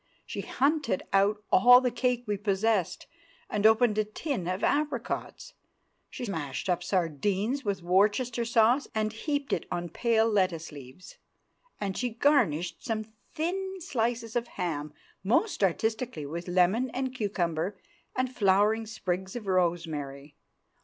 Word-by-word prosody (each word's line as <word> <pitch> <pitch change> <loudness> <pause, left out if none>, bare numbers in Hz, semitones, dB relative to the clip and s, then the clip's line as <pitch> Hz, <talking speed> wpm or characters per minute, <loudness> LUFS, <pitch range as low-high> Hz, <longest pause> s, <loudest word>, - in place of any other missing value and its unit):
She - - -5
hunted 280 - 0
out 205 +2 +3
all 245 +6 +8
the 250 -1 0
cake 250 -1 0
we 210 -2 -1
possessed, 200 -1 0 0.5
and 210 +1 +4
opened 220 -1 +4
a - - +3
tin 215 - -4
of 185 +2 -2
apricots; 300 +1 -2 0.6
she 250 - -6
mashed 160 - -4
up 180 -1 +1
sardines 190 - -1
with 195 -5 -2
Worcester 210 +7 +2
sauce, 235 +4 +3
and 215 0 0
heaped 285 +4 -2
it - - -2
on 175 0 -3
pale 225 +4 +2
lettuce 185 -7 0
leaves, 140 +4 -12 0.6
and 195 -2 -3
she 250 - -1
garnished 225 - +1
some 220 -2 -2 0.3
thin 380 +4 -2
slices 235 - -2
of 240 0 0
ham 155 -5 -2 0.3
most 235 - +1
artistically 220 - -1
with 170 +5 -6
lemon 185 +8 +2
and 260 +1 -3
cucumber 190 -5 -2 0.4
and 255 0 -1
flowering 210 +2 +3
sprigs 190 -2 -3
of 235 -3 -5
rosemary. 160 -6 -1
210 Hz, 135 wpm, -28 LUFS, 180-245 Hz, 0.6 s, all